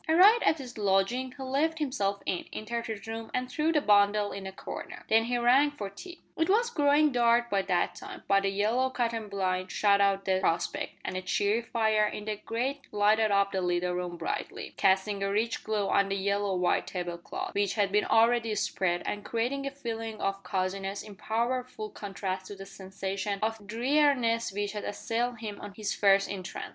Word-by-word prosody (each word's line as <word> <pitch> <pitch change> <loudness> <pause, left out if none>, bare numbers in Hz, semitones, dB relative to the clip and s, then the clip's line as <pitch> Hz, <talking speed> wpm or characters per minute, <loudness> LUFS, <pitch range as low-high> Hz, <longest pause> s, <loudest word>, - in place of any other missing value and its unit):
Arrived 395 +9 +7
at 315 - +3
his 250 -5 -9
lodging 205 +6 +1
he 270 - -6
let 290 +5 0
himself 205 -10 -1
in, 180 - -1
entered 235 +2 -4
his 215 -3 -6
room, 225 0 -6
and 255 0 -2
threw 310 +2 +1
the 310 - +3
bundle 205 -3 +3
in 195 -1 -6
a - - -5
corner. 190 - -8
Then 225 +1 +4
he 245 +1 0
rang 250 +5 +5
for 210 -9 -6
tea. 350 - -11
It 325 +3 0
was 470 +4 +3
growing 295 -3 +4
dark 240 -1 +3
by 200 -1 +2
that 180 -2 0
time, - - -10
but 195 0 +3
a 195 - +2
yellow 220 +6 +1
cotton 230 -3 -2
blind 185 -2 -1
shut 200 -1 +3
out 195 0 +2
the 190 -1 +2
prospect, 165 -2 -1
and 190 - -3
a 185 - -2
cheery 205 +4 +1
fire 220 -2 +2
in 210 - -6
the 215 -1 -2
grate 255 +7 -3
lighted 215 +1 +3
up 200 0 +2
the 190 - -1
little 180 0 0
room 180 -1 -3
brightly, - - -4
casting 195 +1 +2
a 195 - 0
rich 225 +3 0
glow 210 -2 -1
on 200 0 +3
the 195 - 0
yellow 200 0 0
white 180 -1 +1
table 175 -2 -4
cloth, - - -6
which 200 -1 0
had 200 -3 +1
been 210 +1 +2
already 230 -1 +3
spread, 175 -3 0
and 205 0 -3
creating 255 +5 -2
a - - 0
feeling 225 -5 -5
of 195 0 -2
coziness 195 +1 -2
in 210 - -10
powerful 235 +1 -2
contrast 190 -2 -5
to 205 - -8
the 195 0 -9
sensation 195 +1 -4
of 220 -2 -2
dreariness 240 -1 +2
which 205 +1 -2
had 210 -1 -5
assailed 235 +3 -2
him 210 -2 -6
on 205 -1 -9
his 210 -2 -2
first 195 -1 +4
entrance. 195 -1 -6
210 Hz, 200 wpm, -29 LUFS, 195-240 Hz, -, Arrived